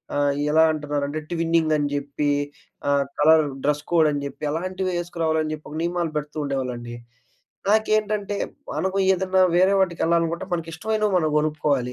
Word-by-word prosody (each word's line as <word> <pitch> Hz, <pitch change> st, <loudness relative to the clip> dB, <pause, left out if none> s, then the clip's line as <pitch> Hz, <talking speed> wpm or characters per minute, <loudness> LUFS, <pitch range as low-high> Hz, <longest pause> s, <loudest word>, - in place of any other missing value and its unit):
ఆహ్, 145 Hz, -1 st, +2 dB, 0.2 s
ఎలా 160 Hz, +1 st, +5 dB
అంటున్నారంటే 145 Hz, 0 st, -2 dB
ట్విన్నింగ్ 165 Hz, -2 st, +1 dB
అని 145 Hz, -1 st, 0 dB
జెప్పి 145 Hz, +1 st, -1 dB, 0.6 s
ఆహ్, 140 Hz, -1 st, +2 dB
కలర్ 155 Hz, 0 st, +6 dB, 0.2 s
డ్రస్ 150 Hz, 0 st, +1 dB
కోడ్ 160 Hz, -3 st, +5 dB
అని 145 Hz, -1 st, -2 dB
జెప్పి 140 Hz, +2 st, -8 dB
అలాంటివి 185 Hz, +3 st, -2 dB
ఏసుకురావాలని 160 Hz, -2 st, -1 dB
జెప్పి 155 Hz, 0 st, -9 dB
ఒక 155 Hz, -, -5 dB
నియమాలు 170 Hz, -2 st, -1 dB
పెడుతూ 150 Hz, +1 st, -5 dB
ఉండేవాళ్ళండి. 125 Hz, -4 st, -4 dB, 0.7 s
నాకేంటంటే 215 Hz, -1 st, +1 dB, 0.4 s
మనకు 190 Hz, +1 st, -1 dB
ఏదన్నా 190 Hz, 0 st, +1 dB
వేరే 185 Hz, +3 st, +4 dB
వాటికి 180 Hz, -3 st, 0 dB
ఎళ్ళాలనుకుంటే 170 Hz, 0 st, +1 dB
మనకి 165 Hz, -1 st, -2 dB
ఇష్టమైనవి 215 Hz, +4 st, -1 dB
మనం 155 Hz, -, +1 dB
గొనుక్కోవాలి. 150 Hz, -5 st, 0 dB
160 Hz, 145 wpm, -23 LUFS, 145-180 Hz, 0.7 s, కలర్